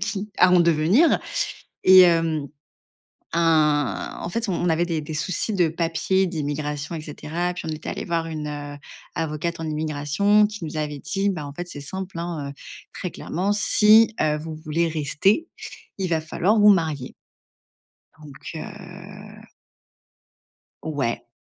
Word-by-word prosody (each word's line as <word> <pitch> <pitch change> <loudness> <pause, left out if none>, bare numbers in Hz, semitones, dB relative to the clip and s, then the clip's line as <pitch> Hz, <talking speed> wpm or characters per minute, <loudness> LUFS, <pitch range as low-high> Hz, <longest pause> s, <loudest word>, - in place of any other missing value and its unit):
qui 210 0 -3
à 180 - +6
en 180 - +6
devenir. 170 - +4 0.7
Et 185 -1 +9
heu, 165 -3 +1 0.9
un 150 - +1
en - - -4
fait, 230 +4 -2
on 175 -1 0
avait 165 +1 +2
des 165 -2 -2
des 150 +1 -7
soucis 185 +7 -2
de 175 -4 +2
papier 170 +4 0
d'immigration, 150 -1 -3
et 160 - -5
cetera, 160 +4 -4
puis 180 - -7
on - - -4
était 155 0 -5
allé - - -4
voir 165 -2 -1
une, 155 -2 -5
heu, 145 -1 -6 0.4
avocate 165 +1 -3
en 165 - -4
immigration, 155 +7 +2
qui 210 -3 -8
nous 155 0 -6
avait 150 -1 -3
dit, 195 +7 -1
bah 165 -7 -3
en 140 - -9
fait, 175 +4 -6
c'est 145 -4 -8
simple 190 +4 -6
hein, 165 -5 -4
heu, - - -8 0.4
très 180 - -4
clairement, 185 +7 -2
si, 215 +1 +5
heu, 150 -1 +2
vous 160 +1 -6
voulez 155 +2 -1
rester, 160 - +1 0.5
il 190 -2 -2
va 160 -2 +1
falloir 185 +7 +1
vous 210 0 +7
marier. 160 -9 +1 1.1
Donc, 145 -2 -11 0.2
heu - - -10 1.4
Ouais. 140 -8 -3
165 Hz, 155 wpm, -23 LUFS, 150-185 Hz, 1.4 s, Et